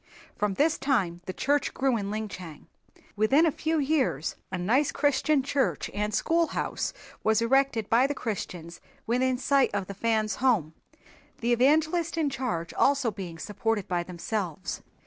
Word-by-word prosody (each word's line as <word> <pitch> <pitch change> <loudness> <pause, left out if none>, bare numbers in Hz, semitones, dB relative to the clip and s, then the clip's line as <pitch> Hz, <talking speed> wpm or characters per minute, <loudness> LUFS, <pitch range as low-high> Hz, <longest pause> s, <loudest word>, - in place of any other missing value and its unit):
From 210 -2 -1
this 305 +6 +2
time 195 -11 0
the - - -2
church 285 +8 0
grew 265 -2 +2
in 200 -3 -2
Linchang. 190 -7 -6 0.5
Within 245 +10 +4
a 325 - +3
few 320 +3 -1
years 270 - 0 0.2
a 185 - -2
nice 240 +11 +2
Christian 290 0 +2
church 275 0 -1
and 210 +1 -1
school 330 +9 +2
house - - -2 0.3
was 220 0 +3
erected 240 -2 +2
by 245 +4 +4
the 290 - -3
Christians 175 -8 -5 0.2
within 250 +2 +1
sight 275 +1 +3
of 200 -2 -1
the 200 - -7
Fans' 215 +1 0
home, 215 - +2 0.6
the 240 +1 +1
evangelist 315 +7 +2
in 305 -3 +1
charge 225 -11 -3
also 275 -4 +2
being 185 -5 -7
supported 210 +3 -2
by 175 -1 0
themselves. 180 0 -4
230 Hz, 155 wpm, -27 LUFS, 195-275 Hz, 0.6 s, Within